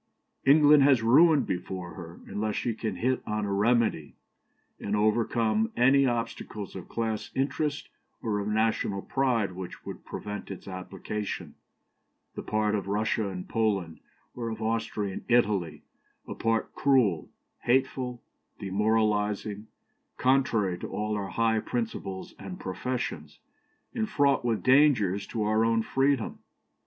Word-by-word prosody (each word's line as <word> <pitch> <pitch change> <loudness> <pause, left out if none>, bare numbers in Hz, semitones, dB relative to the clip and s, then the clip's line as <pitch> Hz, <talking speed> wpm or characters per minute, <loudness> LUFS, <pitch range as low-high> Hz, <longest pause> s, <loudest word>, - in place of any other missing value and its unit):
"England 150 +1 +7
has 135 -4 +5
ruin 145 +4 +6
before 90 -2 -4
her, 85 -2 -10
unless 105 0 -2
she 120 - -1
can 110 -2 -4
hit 130 +7 0
on 105 0 -1
a 100 - -2
remedy, 110 -6 +1 0.6
and 100 - -2
overcome 110 +1 +1
any 135 +3 +5
obstacles 115 -4 -4
of 95 - -8
class 110 -2 -2
interest 145 +2 -1 0.3
or 105 -3 -1
of 100 - -3
national 105 -2 0
pride 125 -7 +1
which 90 0 -8
would - - -8
prevent 105 0 -6
its 95 -1 -8
application, 95 +2 -5 0.8
the - - -5
part 105 0 0
of 100 -2 -2
Russia 105 +1 0
in 90 -2 -5
Poland, 100 -8 -1 0.3
or 115 -2 -4
of 110 -1 -5
Austria 110 -3 -2
in - - -7
Italy 105 -9 +1 0.4
a - - -4
part 115 0 -1
cruel, 120 - +2 0.3
hateful, 125 -1 0 0.3
demoralizing, 105 +1 0 0.5
contrary 115 -9 +2
to - - -5
all 105 0 -2
our 100 -2 -3
high 115 -1 +1
principles 110 -4 -4
and 185 -1 -8
professions, 95 - -4 0.6
and 220 -1 -1
fraught 140 - +2
with 115 -3 0
dangers 130 -8 +4
to 110 -3 -2
our 110 +1 +2
own 115 0 +2
freedom. 135 -1 0
110 Hz, 135 wpm, -28 LUFS, 100-125 Hz, 0.8 s, England